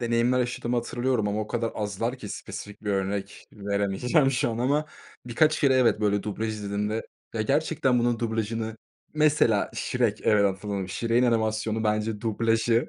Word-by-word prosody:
Deneyimler 120 Hz, +1 st, +2 dB
yaşadığımı 120 Hz, -1 st, -1 dB
hatırlıyorum 120 Hz, -2 st, 0 dB
ama 105 Hz, +1 st, -1 dB
o 105 Hz, -, -3 dB
kadar 115 Hz, 0 st, -2 dB
azlar 110 Hz, +5 st, -2 dB
ki 105 Hz, -, -8 dB
spesifik 105 Hz, +1 st, -8 dB
bir 105 Hz, -, -1 dB
örnek 100 Hz, 0 st, -3 dB
veremeyeceğim, 100 Hz, -, +1 dB
şu 125 Hz, -2 st, 0 dB
an. 115 Hz, -, -4 dB
Ama 145 Hz, +5 st, +1 dB, 0.4 s
birkaç 150 Hz, +6 st, +2 dB
kere, 135 Hz, -3 st, +4 dB
evet, 125 Hz, -4 st, +3 dB
böyle, 105 Hz, -2 st, +1 dB
dublaj 110 Hz, +2 st, -3 dB
izlediğimde 105 Hz, +1 st, -3 dB, 0.3 s
Ya, 110 Hz, -, 0 dB
gerçekten 140 Hz, 0 st, +1 dB
bunun 120 Hz, -1 st, +1 dB
dublajını 110 Hz, -1 st, -2 dB, 0.4 s
Mesela 150 Hz, -9 st, +3 dB
Shrek, 120 Hz, -4 st, 0 dB
evet, 105 Hz, -1 st, +4 dB
hatırladım. 100 Hz, -1 st, -2 dB
Shrek'in 115 Hz, +5 st, +1 dB
animasyonu, 110 Hz, -1 st, 0 dB
bence, 105 Hz, 0 st, 0 dB
dublajı 115 Hz, +1 st, +1 dB
115 Hz, 155 wpm, -26 LUFS, 105-120 Hz, 0.4 s, kere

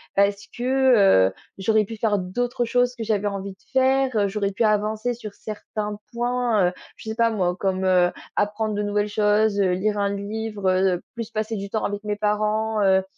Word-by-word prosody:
Parce 200 Hz, 0 st, +2 dB
que, 245 Hz, -, +4 dB
heu, -, -, -14 dB, 0.3 s
j'aurais 215 Hz, +2 st, +2 dB
pu 225 Hz, +2 st, -8 dB
faire 210 Hz, -1 st, +1 dB
d'autres 240 Hz, +7 st, -2 dB
choses 245 Hz, +1 st, +1 dB
que 235 Hz, -, -5 dB
j'avais 210 Hz, -2 st, 0 dB
envie 200 Hz, -1 st, -4 dB
de -, -, -27 dB, 0.2 s
faire. 265 Hz, +1 st, +3 dB
Heu, 205 Hz, -2 st, +3 dB
j'aurais 200 Hz, 0 st, -1 dB
pu 205 Hz, +4 st, -1 dB
avancer 215 Hz, +2 st, +1 dB
sur 220 Hz, -3 st, -8 dB
certains 210 Hz, -1 st, -5 dB
points, 240 Hz, -5 st, +1 dB
heu, -, -, -10 dB, 0.2 s
je 220 Hz, -, -8 dB
sais 220 Hz, -, -3 dB
pas 230 Hz, 0 st, +3 dB
moi 180 Hz, -4 st, 0 dB
comme, 190 Hz, 0 st, -1 dB
heu, 180 Hz, -1 st, +4 dB, 0.2 s
apprendre 210 Hz, +1 st, 0 dB
de 210 Hz, -, -1 dB
nouvelles 205 Hz, 0 st, 0 dB
choses, 210 Hz, 0 st, +2 dB
heu, 190 Hz, -2 st, +3 dB
lire 210 Hz, +3 st, 0 dB
un 200 Hz, 0 st, 0 dB
livre, 210 Hz, 0 st, -4 dB
heu, 185 Hz, -1 st, +2 dB
plus 230 Hz, -2 st, -5 dB
passer 220 Hz, 0 st, -2 dB
du 200 Hz, 0 st, -5 dB
temps 215 Hz, +1 st, -2 dB
avec 205 Hz, 0 st, -3 dB
mes 210 Hz, 0 st, -1 dB
parents, 215 Hz, +1 st, 0 dB
heu 190 Hz, -1 st, +4 dB
210 Hz, 200 wpm, -23 LUFS, 200-225 Hz, 0.3 s, que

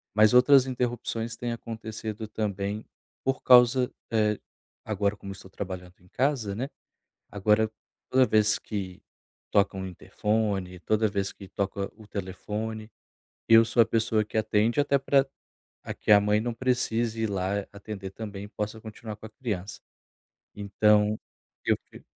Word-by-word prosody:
Mas 110 Hz, +2 st, +6 dB
outras 130 Hz, +1 st, +7 dB
interrupções 120 Hz, -2 st, -2 dB
têm 120 Hz, 0 st, -3 dB
acontecido, 110 Hz, -1 st, -6 dB
também, 105 Hz, 0 st, -3 dB, 0.4 s
por 135 Hz, 0 st, 0 dB
causa, 125 Hz, 0 st, +6 dB, 0.2 s
eh, 105 Hz, -2 st, +2 dB, 0.5 s
agora 105 Hz, -1 st, 0 dB
como 100 Hz, -1 st, -8 dB
estou 95 Hz, -1 st, -11 dB
trabalhando 90 Hz, -2 st, -7 dB
em 90 Hz, -, -21 dB
casa, 130 Hz, -7 st, 0 dB
né. 130 Hz, +5 st, -3 dB, 0.6 s
Agora 105 Hz, +2 st, +2 dB, 0.4 s
toda 130 Hz, 0 st, +5 dB
vez 105 Hz, -2 st, +3 dB
que 95 Hz, -4 st, -5 dB, 0.5 s
toca 100 Hz, -1 st, +3 dB
interfone, 95 Hz, 0 st, -2 dB
toda 110 Hz, +4 st, +1 dB
vez 100 Hz, -1 st, -2 dB
que 95 Hz, -, -12 dB
toca 100 Hz, 0 st, -3 dB
o 110 Hz, -1 st, -14 dB
telefone, 110 Hz, +3 st, -5 dB, 0.6 s
eu 115 Hz, 0 st, +9 dB
sou 115 Hz, +1 st, +3 dB
a -, -, +6 dB
pessoa 110 Hz, -1 st, +1 dB
que 110 Hz, -, -5 dB
atende, 110 Hz, +4 st, +2 dB
até 140 Hz, -1 st, +3 dB
para 135 Hz, 0 st, +3 dB, 0.7 s
que -, -, +1 dB
a 105 Hz, -, +9 dB
mãe 105 Hz, +1 st, +2 dB
não 120 Hz, 0 st, -2 dB
precise 115 Hz, -2 st, 0 dB
ir 110 Hz, -, 0 dB
lá 100 Hz, +1 st, -1 dB
atender 100 Hz, -1 st, -7 dB
também 100 Hz, -1 st, -7 dB
e -, -, -10 dB
possa 105 Hz, +1 st, -4 dB
continuar 110 Hz, -1 st, -8 dB
com 110 Hz, -, -12 dB
a -, -, -8 dB
criança. 105 Hz, -5 st, -5 dB, 0.8 s
Então 105 Hz, +1 st, +3 dB, 0.5 s
eu -, -, +4 dB
que -, -, -14 dB
110 Hz, 145 wpm, -27 LUFS, 100-115 Hz, 0.8 s, eu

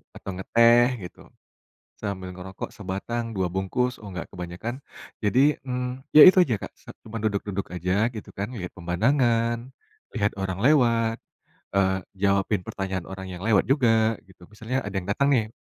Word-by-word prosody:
atau 100 Hz, -, -7 dB
ngeteh 115 Hz, +5 st, +5 dB, 0.2 s
gitu, 90 Hz, -, -12 dB, 0.8 s
sambil 95 Hz, -2 st, -4 dB
ngerokok 95 Hz, +1 st, -7 dB
sebatang, 105 Hz, +5 st, -4 dB
2 95 Hz, -1 st, +1 dB
bungkus 120 Hz, +6 st, -1 dB
oh 105 Hz, -, -8 dB
enggak 90 Hz, -2 st, -6 dB
kebanyakan, 90 Hz, +9 st, -6 dB, 0.4 s
jadi, 130 Hz, +8 st, +3 dB
mmm, 125 Hz, 0 st, -5 dB
ya 155 Hz, -, +12 dB
itu 185 Hz, +1 st, +8 dB
aja 120 Hz, -10 st, +1 dB
Kak, -, -, -7 dB
sat -, -, -13 dB
cuman 115 Hz, 0 st, -5 dB
duduk-duduk 100 Hz, -2 st, -2 dB
aja 90 Hz, +6 st, +1 dB
gitu 110 Hz, -, -8 dB
kan, 100 Hz, +4 st, -4 dB
lihat 90 Hz, -2 st, -6 dB
pemandangan, 115 Hz, +5 st, +1 dB, 0.4 s
lihat 105 Hz, -4 st, +1 dB
orang 95 Hz, -1 st, -3 dB
lewat, 115 Hz, -5 st, +3 dB, 0.6 s
eee, 95 Hz, -1 st, +2 dB, 0.2 s
jawabin 100 Hz, -1 st, +2 dB
pertanyaan 95 Hz, -2 st, -4 dB
orang 95 Hz, 0 st, -7 dB
yang 90 Hz, 0 st, -8 dB
lewat 105 Hz, -4 st, +4 dB
juga, 115 Hz, -5 st, +3 dB
gitu, 90 Hz, -2 st, -17 dB
misalnya 115 Hz, +4 st, -3 dB
ada 100 Hz, -, -6 dB
yang 90 Hz, 0 st, -7 dB
datang 140 Hz, +7 st, +2 dB
nih. 110 Hz, -2 st, -1 dB
105 Hz, 155 wpm, -25 LUFS, 95-120 Hz, 0.8 s, ya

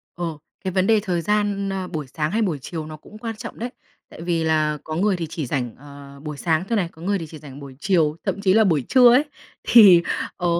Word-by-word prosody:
Ờ, 165 Hz, -3 st, -4 dB, 0.3 s
cái 190 Hz, -, -2 dB
vấn 185 Hz, +1 st, +1 dB
đề 220 Hz, -1 st, +4 dB
thời 180 Hz, -4 st, -2 dB
gian, 205 Hz, +1 st, 0 dB
a, 190 Hz, -1 st, -3 dB
buổi 155 Hz, -4 st, -5 dB
sáng 155 Hz, +4 st, -3 dB
hay 225 Hz, +2 st, 0 dB
buổi 175 Hz, -9 st, -1 dB
chiều 160 Hz, 0 st, -6 dB
nó 155 Hz, 0 st, -9 dB
cũng 210 Hz, +7 st, -14 dB
quan 225 Hz, 0 st, -5 dB
trọng -, -, -9 dB
đấy. 240 Hz, +2 st, -3 dB, 0.4 s
Tại -, -, -12 dB
vì 170 Hz, -1 st, -1 dB
là 155 Hz, -1 st, +1 dB
có 155 Hz, -, -5 dB
người 195 Hz, +3 st, +2 dB
thì 170 Hz, -2 st, -4 dB
chỉ 160 Hz, -3 st, -4 dB
rảnh, 125 Hz, -2 st, -3 dB
ờ, 140 Hz, 0 st, -13 dB
buổi 150 Hz, -2 st, -6 dB
sáng 160 Hz, +1 st, 0 dB
thôi 230 Hz, -, +1 dB
này, 185 Hz, -6 st, 0 dB
có 160 Hz, -, -17 dB
người 200 Hz, +3 st, 0 dB
thì 165 Hz, -, -5 dB
chỉ 155 Hz, 0 st, -10 dB
rảnh 145 Hz, -2 st, -11 dB
buổi 140 Hz, -2 st, -10 dB
chiều, 165 Hz, -6 st, +2 dB
thậm 200 Hz, -, -2 dB
chí 190 Hz, -2 st, +3 dB
là 220 Hz, +2 st, +5 dB
buổi 160 Hz, -9 st, +2 dB
trưa 250 Hz, -2 st, +7 dB
ấy 265 Hz, +4 st, +5 dB, 0.4 s
thì, 200 Hz, -7 st, +8 dB, 0.4 s
ờ, 170 Hz, -1 st, +1 dB
170 Hz, 255 wpm, -22 LUFS, 155-200 Hz, 0.4 s, thì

